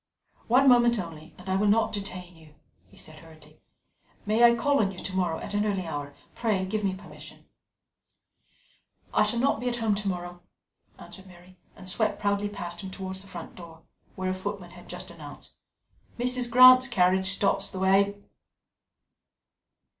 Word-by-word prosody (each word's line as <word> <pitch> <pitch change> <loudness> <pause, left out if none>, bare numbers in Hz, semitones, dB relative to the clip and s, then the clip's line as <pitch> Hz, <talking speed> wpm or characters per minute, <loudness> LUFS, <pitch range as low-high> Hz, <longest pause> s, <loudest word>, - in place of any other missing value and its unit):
"One 255 +4 +4
moment 240 -2 +5
only, 165 -5 -8
and 180 - -14
I 190 - 0
will 210 +2 +1
not 220 +2 +3
detain 185 -3 -6
you," 155 -2 -19 0.3
he - - -21
said 155 -1 -9
hurriedly. 155 -2 -18 0.6
"May 215 +3 +2
I 235 0 +7
call 285 +4 +1
on 195 -3 +1
you 190 - -12
to 185 0 -6
morrow, 175 -4 0
at - - -8
an 205 0 +1
early 195 -4 -1
hour? 145 -3 -6 0.2
Pray 210 -5 -1
give 210 +2 -3
me 190 -1 0
permission." 195 - -13 1.7
"I - - +3
shall 240 - +1
not 260 -2 +1
be 245 +1 -1
at 240 - -2
home 225 -3 0
to 205 0 -3
morrow," 175 -1 -5 0.6
answered 190 0 -13
Mary, 180 0 -17 0.2
and 185 - -13
swept 205 +1 -1
proudly 205 0 0
past 175 -3 -7
him 190 - -7
towards 190 0 -6
the 195 - -15
front 175 -3 -9
door, 165 -2 -13 0.3
where 185 0 -2
a - - -1
footman 185 -1 -6
had 175 - -15
just 180 0 -8
announced: 150 -4 -12 0.6
"Mrs. 250 0 0
Grant's 255 +1 +8
carriage 190 -5 +2
stops 195 +1 +1
the - - -8
way." 195 +2 +3
190 Hz, 175 wpm, -27 LUFS, 180-215 Hz, 1.7 s, Grant's